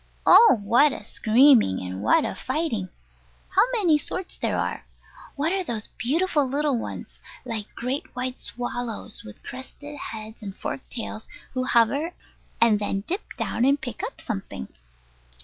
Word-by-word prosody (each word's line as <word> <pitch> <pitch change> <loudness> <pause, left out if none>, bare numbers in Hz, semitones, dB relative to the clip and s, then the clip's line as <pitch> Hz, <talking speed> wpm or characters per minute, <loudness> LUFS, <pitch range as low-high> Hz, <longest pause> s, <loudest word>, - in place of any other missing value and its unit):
Oh, 450 - +8
what 245 +8 +5
a - - -7
screaming 230 - +5
and 95 +1 -5
what 110 - +4
a - - -2
fighting! 245 - -2 0.6
How - - +4
many 350 -10 +4
sorts 370 +4 -5
there - - 0
are! - - -2 0.5
What 310 +5 0
are 385 -1 0
those 230 -9 -4
beautiful 305 +5 +2
little 285 +1 +1
ones, 230 - -6 0.3
like 220 -4 -5
great 255 +4 -3
white 255 0 -3
swallows, 245 -2 -5
with 105 - -12
crested 285 +3 -9
heads 220 -2 -7
and 200 -2 -7
forked 135 - -5
tails, 220 -2 -5 0.2
who 255 0 -1
hover, 275 +9 +2 0.4
and 225 -3 +5
then 200 -1 -1
dip 375 +5 -2 0.2
down 235 - -1
and 280 +2 +4
pick 245 -1 -6
up 440 +5 -5
something? 195 - -5
250 Hz, 150 wpm, -25 LUFS, 220-295 Hz, 0.6 s, Oh